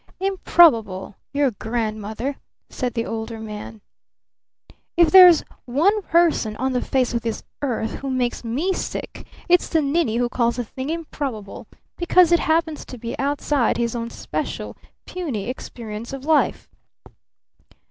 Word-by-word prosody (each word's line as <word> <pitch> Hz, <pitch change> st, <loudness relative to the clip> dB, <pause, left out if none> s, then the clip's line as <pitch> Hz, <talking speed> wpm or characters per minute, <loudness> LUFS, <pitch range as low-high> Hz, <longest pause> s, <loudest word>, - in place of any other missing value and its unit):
"Improbable 280 Hz, -, +3 dB, 0.2 s
your 280 Hz, -2 st, +2 dB
grandmother!" 220 Hz, +3 st, -3 dB, 0.3 s
said 250 Hz, -2 st, -3 dB
the 230 Hz, 0 st, -1 dB
Older 225 Hz, 0 st, -5 dB
Man. 215 Hz, 0 st, -8 dB, 1.2 s
"If 340 Hz, -2 st, +5 dB
there's 360 Hz, -3 st, +9 dB, 0.2 s
one 345 Hz, -, +2 dB
person 335 Hz, -, +2 dB
on 260 Hz, +3 st, -1 dB
the 250 Hz, -, 0 dB
face 255 Hz, -3 st, 0 dB
of 235 Hz, -, 0 dB
this 225 Hz, -1 st, -4 dB, 0.2 s
earth 230 Hz, -5 st, -1 dB
who 275 Hz, -, -5 dB
makes 250 Hz, -2 st, -1 dB
me 280 Hz, +12 st, -1 dB
sick -, -, -6 dB, 0.2 s
it's 355 Hz, 0 st, +3 dB
the 325 Hz, -, +2 dB
ninny 280 Hz, -5 st, +1 dB
who 245 Hz, 0 st, +1 dB
calls 235 Hz, -1 st, 0 dB
a 245 Hz, -, -1 dB
thing 260 Hz, +5 st, -6 dB
'improbable' 285 Hz, -10 st, -5 dB, 0.3 s
because 345 Hz, 0 st, +4 dB
it 345 Hz, -, +5 dB
happens 320 Hz, -1 st, 0 dB
to 255 Hz, -, -9 dB
be 230 Hz, 0 st, -5 dB
outside 280 Hz, -2 st, +1 dB
his 235 Hz, 0 st, -1 dB
own 230 Hz, 0 st, -3 dB
special, -, -, -5 dB, 0.3 s
puny 285 Hz, -, -4 dB
experience 235 Hz, -2 st, -7 dB
of 270 Hz, 0 st, -7 dB
life." 305 Hz, -4 st, +2 dB
255 Hz, 140 wpm, -22 LUFS, 230-320 Hz, 1.2 s, there's